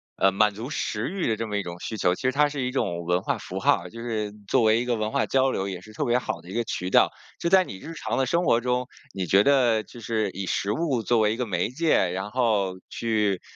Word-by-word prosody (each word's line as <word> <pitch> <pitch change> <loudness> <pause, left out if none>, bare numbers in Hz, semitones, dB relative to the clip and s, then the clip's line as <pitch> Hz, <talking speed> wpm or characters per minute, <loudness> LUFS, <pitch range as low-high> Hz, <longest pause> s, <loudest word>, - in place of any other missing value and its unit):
呃， 95 - +3
满 105 +2 +3
足 115 +5 -6
食 115 -6 -2
欲 190 0 -2
的 110 - +1
这 115 +1 -4
么 105 -1 -2
一 100 - -1
种 85 0 -7
需 110 - -4
求， 90 -1 +2
其 - - -11
实 130 - +2
它 145 +2 +3
是 145 -1 -4
一 125 - -1
种 85 -10 -1
文 90 +1 +1
化 - - -1
符 - - -6
号 - - +3
儿， 90 - -9
就 115 - -9
是 110 -3 -2 0.2
作 - - +3
为 110 +1 +4
一 120 - -2
个 125 -1 +1
文 110 -1 -2
化 140 - +1
交 135 0 +2
流 95 - -2
也 95 -2 -5
是 110 - -14
特 140 +7 -2
别 120 0 +3
好 125 - -3
的 85 - -14
一 - - -7
个 120 0 0
渠 90 -4 -3
道。 - - +5 0.3
就 170 - +1
在 190 +1 +6
你 95 - -8
日 160 +12 -9
常 - - -3
的 135 - +2
生 170 +7 +1
活 115 - +3
中， 125 0 0 0.3
你 95 -1 -2
觉 100 +4 +5
得 125 -6 +3
就 120 - -13
是 110 -2 -1
以 95 +1 -5
食 100 +2 -1
物 130 -2 0
作 120 +1 +2
为 105 0 +3
一 - - -6
个 125 - -1
媒 90 -5 -1
介， 130 - +2
然 95 +3 -4
后 105 -7 +1
去， 105 -5 0
110 Hz, 305 characters per minute, -25 LUFS, 100-125 Hz, 0.3 s, 在